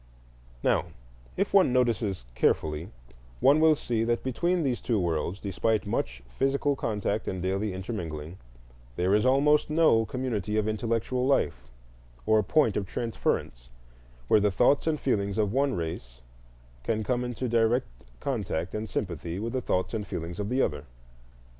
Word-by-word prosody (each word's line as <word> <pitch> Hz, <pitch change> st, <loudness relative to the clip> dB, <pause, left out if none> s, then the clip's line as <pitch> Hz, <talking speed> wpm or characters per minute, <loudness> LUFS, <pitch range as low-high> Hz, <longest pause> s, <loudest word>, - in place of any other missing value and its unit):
Now -, -, +2 dB, 0.5 s
if 195 Hz, -, 0 dB
one 195 Hz, -9 st, +5 dB
notices 115 Hz, -, 0 dB
carefully 75 Hz, +6 st, 0 dB, 0.5 s
one 145 Hz, +3 st, +5 dB
will 160 Hz, -1 st, +6 dB
see 115 Hz, -5 st, -1 dB
that 120 Hz, 0 st, 0 dB
between 170 Hz, +7 st, 0 dB
these 130 Hz, -4 st, -1 dB
two 115 Hz, -4 st, 0 dB
worlds, 85 Hz, +2 st, -1 dB
despite 105 Hz, +3 st, 0 dB
much 65 Hz, -11 st, -3 dB, 0.2 s
physical 140 Hz, +1 st, +2 dB
contact 105 Hz, -3 st, -2 dB
and 95 Hz, -, -2 dB
daily 95 Hz, +3 st, -1 dB
intermingling, 90 Hz, -4 st, -5 dB, 0.6 s
there 90 Hz, +6 st, +1 dB
is 105 Hz, +4 st, +3 dB
almost 145 Hz, +4 st, +4 dB
no 155 Hz, -8 st, +4 dB
community 110 Hz, -6 st, -2 dB
of 110 Hz, 0 st, +1 dB
intellectual 115 Hz, +4 st, -1 dB
life -, -, 0 dB, 0.6 s
or 110 Hz, 0 st, +4 dB
point 125 Hz, +1 st, +2 dB
of 100 Hz, -, -2 dB
transference -, -, -2 dB, 0.6 s
where 105 Hz, -, +5 dB
the 105 Hz, 0 st, +3 dB
thoughts 125 Hz, -, +3 dB
and 155 Hz, -2 st, +1 dB
feelings 100 Hz, -6 st, 0 dB
of 105 Hz, -1 st, +1 dB
one 135 Hz, 0 st, +1 dB
race 65 Hz, -7 st, -5 dB, 0.6 s
can 110 Hz, -, -1 dB
come 125 Hz, +2 st, 0 dB
into 125 Hz, +1 st, -3 dB
direct 115 Hz, +2 st, +2 dB, 0.3 s
contact 95 Hz, -9 st, -2 dB
and 110 Hz, 0 st, -4 dB
sympathy 85 Hz, -3 st, -3 dB
with 115 Hz, +3 st, -3 dB
the 130 Hz, -, 0 dB
thoughts 90 Hz, -3 st, -1 dB
and 105 Hz, -3 st, -3 dB
feelings 85 Hz, +1 st, -5 dB
of 105 Hz, 0 st, -2 dB
the 130 Hz, +2 st, +2 dB
other. 75 Hz, -1 st, -2 dB
110 Hz, 155 wpm, -28 LUFS, 95-125 Hz, 0.6 s, will